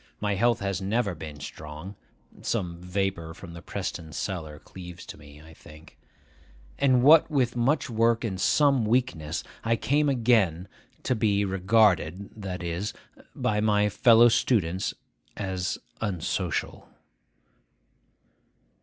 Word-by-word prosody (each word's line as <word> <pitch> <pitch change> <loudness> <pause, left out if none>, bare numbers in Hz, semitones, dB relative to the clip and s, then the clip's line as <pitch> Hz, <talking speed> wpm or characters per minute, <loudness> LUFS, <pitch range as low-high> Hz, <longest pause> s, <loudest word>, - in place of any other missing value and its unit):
My 105 -1 0
health 115 +3 +2
has 100 -1 -2
never 100 +1 0
been 75 -3 -9
strong 75 +7 -8 0.5
(some 90 -6 -3
vapour 90 -3 -3
from 85 -1 -11
the 85 - -9
Preston 80 -2 -5
cellar 80 -6 -4
cleaves 90 +2 -11
to - - -9
me, 75 0 -15
I 80 0 -14
think); 75 0 -16 0.8
and 130 -3 +4
what 155 +4 +7
with 130 -6 +1
much 125 +6 +1
work 115 0 +2
and 95 -5 -3
some 140 +1 +3
weakness, 90 - 0 0.2
I 115 0 +2
came 145 +5 +1
again 110 -9 +2 0.4
to - - +1
be 105 -3 +1
regarded—that 95 -1 +1
is, 85 +6 -3 0.4
by 105 -1 0
my 105 -1 +3
fellow 115 +4 +6
students—as 95 - -2 0.2
unsocial. 95 -7 -3
100 Hz, 120 wpm, -26 LUFS, 85-115 Hz, 0.8 s, what